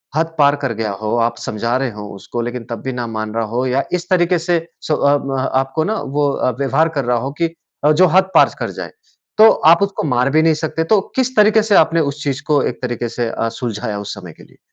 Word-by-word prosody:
हद 160 Hz, +1 st, 0 dB
पार 145 Hz, -1 st, +4 dB
कर 130 Hz, -4 st, 0 dB
गया 110 Hz, -1 st, -3 dB
हो, 110 Hz, +1 st, -1 dB
आप 115 Hz, 0 st, 0 dB
समझा 115 Hz, +3 st, -2 dB
रहे 130 Hz, -2 st, -2 dB
हो 105 Hz, -1 st, -8 dB
उसको 120 Hz, +4 st, -5 dB
लेकिन 120 Hz, 0 st, -4 dB
तब 115 Hz, -, -5 dB
भी 130 Hz, -, -2 dB
ना 120 Hz, -1 st, -4 dB
मान 110 Hz, -1 st, -4 dB
रहा 115 Hz, -1 st, 0 dB
हो 125 Hz, +2 st, 0 dB
या 130 Hz, +2 st, +1 dB
इस 180 Hz, +1 st, -2 dB
तरीके 180 Hz, -1 st, +2 dB
से 170 Hz, +1 st, +1 dB, 0.3 s
सो 155 Hz, -, +2 dB, 0.2 s
अब 140 Hz, -1 st, -2 dB, 0.2 s
आपको 135 Hz, +4 st, 0 dB
ना 215 Hz, +6 st, -1 dB
वो 145 Hz, +1 st, 0 dB
अ, 130 Hz, -, 0 dB
व्यवहार 155 Hz, +4 st, +2 dB
कर 135 Hz, -, -2 dB
रहा 120 Hz, 0 st, +1 dB
हो 130 Hz, +4 st, -3 dB
कि 165 Hz, 0 st, 0 dB, 0.3 s
अ, 150 Hz, -, +5 dB
जो 180 Hz, +5 st, +5 dB
हद 190 Hz, 0 st, +3 dB
पार -, -, +6 dB
कर -, -, -3 dB
जाए -, -, -6 dB, 0.5 s
तो 220 Hz, +1 st, +8 dB, 0.2 s
आप 170 Hz, -, 0 dB
उसको 200 Hz, 0 st, -2 dB
मार 125 Hz, -3 st, +1 dB
भी 155 Hz, +3 st, +3 dB
नहीं 165 Hz, 0 st, +4 dB
सकते। 160 Hz, +1 st, -2 dB
तो 210 Hz, +4 st, +4 dB, 0.2 s
किस 260 Hz, 0 st, 0 dB
तरीके 215 Hz, +1 st, +5 dB
से 210 Hz, -2 st, +2 dB
आपने 165 Hz, 0 st, +4 dB
उस 145 Hz, +1 st, -9 dB
चीज़ 140 Hz, -1 st, -2 dB
को 145 Hz, -2 st, +3 dB
एक -, -, -4 dB
तरीके 120 Hz, -1 st, -3 dB
से 120 Hz, 0 st, -2 dB
अ, 115 Hz, -, -2 dB
सुलझाया 110 Hz, -3 st, -4 dB
उस 100 Hz, 0 st, -6 dB
समय 90 Hz, -5 st, -10 dB
के -, -, -15 dB
लिए? -, -, -21 dB
140 Hz, 255 wpm, -18 LUFS, 120-165 Hz, 0.5 s, तो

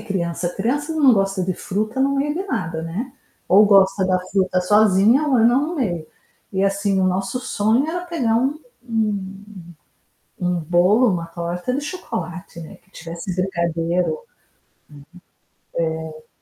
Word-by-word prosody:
a -, -, -11 dB
criança. 175 Hz, -4 st, -2 dB
Criança 285 Hz, +10 st, -1 dB
não 285 Hz, -5 st, +5 dB
gosta 195 Hz, -2 st, +1 dB
de 185 Hz, -, -1 dB
fruta 215 Hz, +9 st, -3 dB
no 275 Hz, +1 st, +2 dB
meio 295 Hz, +2 st, 0 dB
de 365 Hz, -, -2 dB
nada, 165 Hz, -, -3 dB
né. 200 Hz, +11 st, -5 dB, 0.4 s
Ou 205 Hz, +3 st, +7 dB
gosta 195 Hz, -1 st, +4 dB
da 185 Hz, -1 st, +2 dB
fruta 185 Hz, -1 st, +1 dB
sozinha 210 Hz, +6 st, +4 dB
ou 265 Hz, -4 st, +3 dB
não 245 Hz, +6 st, +3 dB
no 345 Hz, -, -5 dB
meio. 175 Hz, -, -2 dB, 0.5 s
E, 190 Hz, 0 st, 0 dB
assim, 195 Hz, 0 st, +1 dB
o -, -, +2 dB
nosso 195 Hz, +6 st, -1 dB
sonho 230 Hz, +2 st, +1 dB
era 350 Hz, +2 st, -3 dB
pegar 255 Hz, -10 st, 0 dB
um 270 Hz, +5 st, 0 dB, 0.3 s
um 205 Hz, -3 st, -3 dB, 0.8 s
um 180 Hz, -1 st, 0 dB
bolo, 180 Hz, +9 st, +3 dB
uma 170 Hz, -2 st, -3 dB
torta 170 Hz, +6 st, -4 dB
de 280 Hz, -, -1 dB
chocolate, 185 Hz, -, -6 dB
né, 160 Hz, -, -10 dB
que 190 Hz, -, -32 dB
tivesse 170 Hz, +2 st, -6 dB
brigadeiro. 170 Hz, -1 st, 0 dB, 2.0 s
Uhum. 155 Hz, -, -10 dB
É. -, -, -43 dB
195 Hz, 155 wpm, -21 LUFS, 180-245 Hz, 2.0 s, Ou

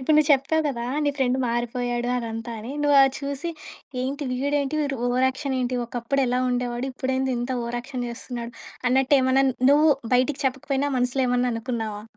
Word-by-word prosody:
ఇప్పుడు 300 Hz, +4 st, +2 dB
నువ్వు 305 Hz, 0 st, +4 dB
చెప్తావు 295 Hz, +4 st, +2 dB
కదా! 240 Hz, -5 st, -2 dB, 0.2 s
నీ 290 Hz, -, +3 dB
ఫ్రెండ్ 260 Hz, -1 st, +1 dB
మారిపోయాడు 240 Hz, +1 st, -1 dB
అదంతా 230 Hz, 0 st, -4 dB
అని. 230 Hz, -, -7 dB
నువ్వు 290 Hz, -1 st, +4 dB
అది 270 Hz, -1 st, +3 dB
చూసి 280 Hz, +4 st, -3 dB, 0.5 s
ఏంటి? 280 Hz, +3 st, -3 dB
వీడేంటి? 280 Hz, +2 st, 0 dB
వీడు 275 Hz, -2 st, -1 dB
ఓవర్ 250 Hz, +1 st, +2 dB
యాక్షన్ 265 Hz, +1 st, -3 dB
ఏంటి? 250 Hz, 0 st, -1 dB
ఒకప్పుడెలా 250 Hz, +1 st, 0 dB
ఉండేవాడు? 245 Hz, 0 st, -2 dB
ఇప్పుడేంది 260 Hz, 0 st, -1 dB
ఇంత 245 Hz, +2 st, -3 dB
ఓవర్ 235 Hz, +1 st, -3 dB
యాక్షన్ 250 Hz, -1 st, -5 dB
చేస్తున్నాడు? 235 Hz, 0 st, -6 dB, 0.4 s
అన్నట్టేమన్నా 265 Hz, 0 st, +3 dB, 0.3 s
నువ్వు 300 Hz, +2 st, +5 dB, 0.2 s
బయటికి 260 Hz, +3 st, +2 dB
చెప్పకపోయినా 270 Hz, +1 st, 0 dB
మనసులో 250 Hz, +1 st, +1 dB
ఏమన్నా 250 Hz, 0 st, +1 dB
అనుకున్నావా? 225 Hz, -3 st, -4 dB
255 Hz, 160 wpm, -24 LUFS, 245-275 Hz, 0.5 s, నువ్వు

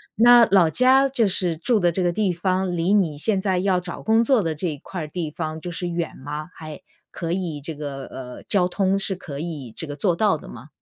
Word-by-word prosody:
那 240 Hz, 0 st, +7 dB
老 185 Hz, -4 st, +5 dB
家 260 Hz, +4 st, +5 dB
就 245 Hz, -6 st, +1 dB
是 180 Hz, -3 st, +1 dB
住 220 Hz, +8 st, +1 dB
的 175 Hz, -2 st, +2 dB
这 185 Hz, -, -2 dB
个 175 Hz, -1 st, +2 dB
地 195 Hz, -1 st, 0 dB
方 185 Hz, +1 st, -1 dB
离 170 Hz, +3 st, 0 dB
你 165 Hz, -7 st, +1 dB
现 200 Hz, +4 st, +1 dB
在 190 Hz, -2 st, 0 dB
要 185 Hz, -1 st, +1 dB
找 180 Hz, -1 st, -7 dB
工 225 Hz, +1 st, +3 dB
作 245 Hz, -1 st, +3 dB
的 165 Hz, -4 st, -2 dB
这 175 Hz, +4 st, -2 dB
一 150 Hz, -3 st, -4 dB
块 175 Hz, +4 st, -7 dB
儿 155 Hz, -, -5 dB
地 160 Hz, 0 st, -4 dB
方 155 Hz, 0 st, -5 dB
就 175 Hz, -, -6 dB
是 175 Hz, +1 st, -4 dB
远 170 Hz, -1 st, -3 dB
吗？ 150 Hz, +4 st, -6 dB
还， 155 Hz, -2 st, -9 dB, 0.3 s
可 170 Hz, -1 st, -4 dB
以 170 Hz, -5 st, -3 dB
这 160 Hz, +3 st, -6 dB
个 140 Hz, -2 st, -6 dB
呃， 125 Hz, -1 st, -9 dB
交 180 Hz, -3 st, +1 dB
通 195 Hz, +1 st, 0 dB
是 195 Hz, -1 st, +1 dB
可 145 Hz, -5 st, -8 dB
以 150 Hz, -8 st, -6 dB
这 160 Hz, -, -6 dB
个 145 Hz, -, -6 dB
做 180 Hz, +2 st, +1 dB
到 205 Hz, -7 st, +2 dB
的 -, -, -12 dB
吗？ 125 Hz, +4 st, -11 dB
175 Hz, 260 characters per minute, -23 LUFS, 155-195 Hz, 0.3 s, 那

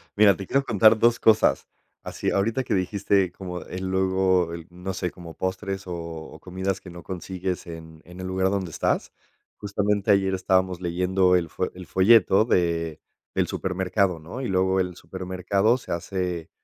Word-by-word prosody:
Mira, 105 Hz, -2 st, +6 dB
te 95 Hz, -, -7 dB
quiero 140 Hz, 0 st, +2 dB
contar 110 Hz, -1 st, +5 dB
2 120 Hz, +1 st, +4 dB
cosas, 110 Hz, -1 st, +3 dB, 0.4 s
así -, -, -3 dB
ahorita 115 Hz, +6 st, 0 dB
que -, -, -2 dB
dijiste 95 Hz, 0 st, +1 dB
como 90 Hz, -1 st, -7 dB
el 95 Hz, +1 st, -6 dB
luego 95 Hz, -2 st, +1 dB
el 85 Hz, -1 st, -8 dB
no 90 Hz, +2 st, -6 dB
sé, 90 Hz, -1 st, -3 dB
como 85 Hz, -2 st, -11 dB
postres, 95 Hz, +1 st, -4 dB
o 90 Hz, -, -4 dB
o 85 Hz, -1 st, -8 dB
comidas 95 Hz, +1 st, -3 dB
que 95 Hz, -, -11 dB
no 85 Hz, -1 st, -10 dB
consigues 95 Hz, 0 st, -4 dB
en 80 Hz, -1 st, -10 dB
en 90 Hz, +2 st, -12 dB
el 95 Hz, -, -5 dB
lugar 95 Hz, 0 st, +1 dB
donde 95 Hz, -3 st, -2 dB
estás, -, -, -1 dB, 0.4 s
justamente 105 Hz, 0 st, 0 dB
ayer 95 Hz, -1 st, +3 dB
estábamos 95 Hz, -1 st, +1 dB
leyendo 90 Hz, +1 st, +2 dB
el 85 Hz, -2 st, 0 dB
fo 90 Hz, -, -3 dB
el 90 Hz, 0 st, -10 dB
folleto 95 Hz, +2 st, +5 dB
de 85 Hz, -6 st, 0 dB, 0.3 s
del -, -, +1 dB
supermercado, 95 Hz, -1 st, 0 dB
¿no?, 85 Hz, +12 st, -7 dB
y 130 Hz, -, -2 dB
luego 95 Hz, 0 st, +2 dB
el 90 Hz, -1 st, -3 dB
supermercado 95 Hz, +4 st, 0 dB
se 130 Hz, -, -6 dB
hace, 90 Hz, -1 st, -3 dB
95 Hz, 175 wpm, -25 LUFS, 90-100 Hz, 0.4 s, Mira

